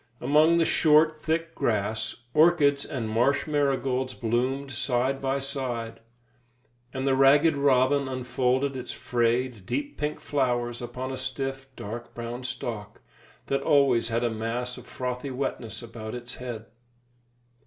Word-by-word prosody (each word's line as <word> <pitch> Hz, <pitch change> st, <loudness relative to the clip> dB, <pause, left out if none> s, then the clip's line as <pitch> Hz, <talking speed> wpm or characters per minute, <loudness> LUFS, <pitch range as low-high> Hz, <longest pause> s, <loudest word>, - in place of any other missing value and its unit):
Among 155 Hz, +4 st, +4 dB
the 165 Hz, -, +3 dB
short, 155 Hz, 0 st, +4 dB
thick 165 Hz, +2 st, -2 dB
grass, 110 Hz, +1 st, -1 dB
orchids 150 Hz, -3 st, +4 dB
and 120 Hz, -5 st, -4 dB
marsh 120 Hz, +6 st, +2 dB
marigolds 135 Hz, -3 st, 0 dB
bloomed 130 Hz, +4 st, -1 dB
side 130 Hz, +2 st, 0 dB
by 135 Hz, 0 st, 0 dB
side, 125 Hz, -5 st, -3 dB, 0.9 s
and 130 Hz, +1 st, -3 dB
the 135 Hz, -1 st, +3 dB
ragged 145 Hz, +4 st, +5 dB
robin 140 Hz, 0 st, +3 dB
unfolded 130 Hz, +1 st, 0 dB
its 125 Hz, -1 st, -5 dB
frayed, 120 Hz, -2 st, 0 dB
deep 290 Hz, 0 st, -3 dB
pink 150 Hz, 0 st, -2 dB
flowers 120 Hz, -4 st, -1 dB
upon 130 Hz, +2 st, -5 dB
a 130 Hz, -, -4 dB
stiff, 135 Hz, 0 st, -4 dB
dark 120 Hz, +3 st, -7 dB
brown 120 Hz, +1 st, -5 dB
stalk, 115 Hz, -4 st, -5 dB, 0.4 s
that 135 Hz, 0 st, 0 dB
always 140 Hz, -5 st, +3 dB
had 115 Hz, +1 st, 0 dB
a 120 Hz, -, +1 dB
mass 115 Hz, +3 st, -3 dB
of -, -, -12 dB
frothy 125 Hz, +2 st, -4 dB
wetness 120 Hz, -3 st, -4 dB
about 115 Hz, -1 st, -7 dB
its 120 Hz, 0 st, -6 dB
head. 120 Hz, -3 st, -6 dB
130 Hz, 135 wpm, -27 LUFS, 120-140 Hz, 0.9 s, ragged